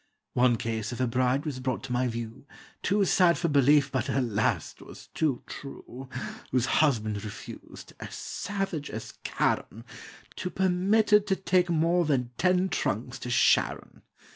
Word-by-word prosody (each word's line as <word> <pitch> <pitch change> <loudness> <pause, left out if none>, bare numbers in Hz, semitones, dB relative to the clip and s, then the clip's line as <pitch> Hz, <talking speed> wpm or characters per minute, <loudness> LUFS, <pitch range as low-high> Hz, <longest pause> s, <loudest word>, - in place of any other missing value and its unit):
One 125 -1 +4
case 110 -1 -3
of 120 - -6
a 130 - +2
bride 125 +4 +1
was 140 -4 -3
brought 130 0 -2
to 135 - -7
my 125 +1 +1
view, 120 +3 -6 0.3
Too 200 0 +2
sad 175 -2 +4
for 170 - 0
belief, 145 0 +4
but, 130 -4 -1
alas! 115 -5 0
't - - -16
was - - -13
too 150 -6 0
true, 135 -2 -9 0.4
Whose 125 -1 +1 0.2
husband 110 -9 +1
refused, 105 - -10
as - - -7
savage 195 -7 -4
as 110 - -7
Charon, 115 +2 -1 0.5
To 180 - -3
permit 190 +4 +2
her 210 - +8
to 205 -2 -1
take 185 -2 +1
more 170 +1 +2
than 125 -5 0
ten 180 +1 +3
trunks 120 - -2
to 125 - -6
Sharon. 120 - +2
135 Hz, 160 wpm, -28 LUFS, 120-180 Hz, 0.5 s, her